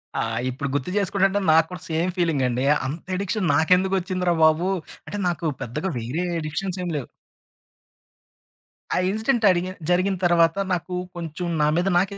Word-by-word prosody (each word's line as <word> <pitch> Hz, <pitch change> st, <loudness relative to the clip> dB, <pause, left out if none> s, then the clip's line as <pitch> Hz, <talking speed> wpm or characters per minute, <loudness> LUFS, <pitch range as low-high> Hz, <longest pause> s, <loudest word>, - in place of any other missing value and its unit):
ఆ! -, -, 0 dB, 0.3 s
ఇప్పుడు 135 Hz, +3 st, -4 dB
గుర్తు 145 Hz, +2 st, -1 dB
జేసుకుంటంటే, 195 Hz, 0 st, +2 dB
నాకు 160 Hz, 0 st, +5 dB
కూడా 180 Hz, -1 st, -7 dB
సేమ్ 165 Hz, +3 st, 0 dB
ఫీలింగండీ. 135 Hz, -7 st, +1 dB, 0.2 s
అంతెడిక్షన్ 185 Hz, +6 st, -2 dB
నాకెందుకొచ్చింది 185 Hz, +2 st, +2 dB
రా 170 Hz, -, +3 dB
బాబు, 160 Hz, +4 st, +4 dB, 0.4 s
అంటే, 205 Hz, -, -5 dB
నాకు 175 Hz, -1 st, -2 dB, 0.2 s
పెద్దగా 145 Hz, +10 st, -3 dB
వేరే 125 Hz, +10 st, -3 dB, 0.2 s
ఎడిక్షన్సేం 180 Hz, +4 st, -3 dB
లేవు. 135 Hz, -, -5 dB, 1.9 s
ఆ -, -, +2 dB
ఇన్సిడెంటడిగిన్ 200 Hz, -5 st, +1 dB
జరిగిన 185 Hz, +2 st, +2 dB
తరవాత, 170 Hz, 0 st, +4 dB, 0.2 s
నాకు 180 Hz, +1 st, -3 dB, 0.2 s
కొంచుం 170 Hz, 0 st, -5 dB
నా 150 Hz, -, +4 dB
మీద 175 Hz, +3 st, +1 dB
నాకే 195 Hz, +2 st, 0 dB
175 Hz, 135 wpm, -23 LUFS, 160-190 Hz, 1.9 s, నాకు